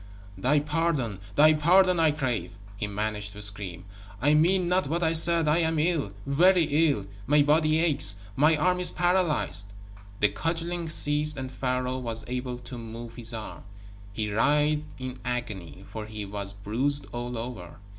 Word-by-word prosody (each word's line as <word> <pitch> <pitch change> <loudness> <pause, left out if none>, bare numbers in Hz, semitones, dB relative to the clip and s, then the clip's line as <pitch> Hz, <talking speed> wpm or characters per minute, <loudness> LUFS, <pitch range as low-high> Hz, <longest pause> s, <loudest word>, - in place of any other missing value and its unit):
"Thy 130 +10 +1
pardon, 150 - -2 0.2
thy 155 +2 +6
pardon, 180 +4 +3
I 160 -1 +4
crave," 125 - -3 0.2
he 105 - -4
managed 105 0 -4
to 105 - -10
scream. 100 -3 -6 0.3
"I 145 +5 +2
mean 175 +4 +2
not 180 -2 +1
what 170 +4 -2
I 160 0 +1
said. 165 0 +6
I 150 +3 +3
am 160 -1 0
ill 155 - 0
very 175 +6 +4 0.3
ill. 105 -9 -2 0.2
My 145 +1 +4
body 155 +1 +2
aches. 150 -12 +7 0.2
My 150 +3 +3
arm 180 +4 +1
is 180 - +2
paralyzed." 170 - 0 0.5
The 105 - +3
cudgeling 165 +1 -3
ceased 150 -1 +1
and 130 -1 -6
Pharaoh 130 0 -2
was 115 -2 -5
able 125 0 -4
to 125 0 -9
move 115 +1 -9
his 115 -1 -3
arm. 110 -2 -8 0.5
He 105 0 -4
writhed 150 +6 +1
in 130 -1 -7
agony, 105 - -5
for 110 0 -8
he 105 -1 -7
was 100 0 -5
bruised 120 +9 -2
all 120 0 -5
over. 115 -7 -8
135 Hz, 165 wpm, -26 LUFS, 110-160 Hz, 0.5 s, aches